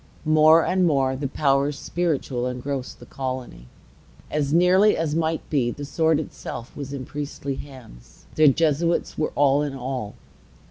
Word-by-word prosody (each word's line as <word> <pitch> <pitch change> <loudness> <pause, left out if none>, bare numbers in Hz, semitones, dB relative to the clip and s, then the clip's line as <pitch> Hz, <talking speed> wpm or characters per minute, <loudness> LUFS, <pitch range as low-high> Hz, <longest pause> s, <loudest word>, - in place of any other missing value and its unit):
More 155 +1 +5
and 185 -1 +2
more 135 -4 +1
the 140 +1 -3
powers 140 +1 +1
spiritual 140 -8 -2
engrossed 125 +1 -5
the - - -12
colony. 130 - -6 0.6
As 145 -2 -1
nearly 185 +5 +4
as 160 -2 -1
might 160 0 -1
be, 130 -6 +1
the 145 +4 -6
sword 160 +1 +1
itself 125 -5 -7
was 140 -2 -6
in 135 -2 -5
priestly 145 -1 -5
hands. 115 - -13
The 155 -1 +5
Jesuits 165 +3 +1
were 155 - -1
all 140 0 +3
in 145 -2 -3
all. 125 -5 -5
140 Hz, 150 wpm, -23 LUFS, 130-155 Hz, 0.6 s, More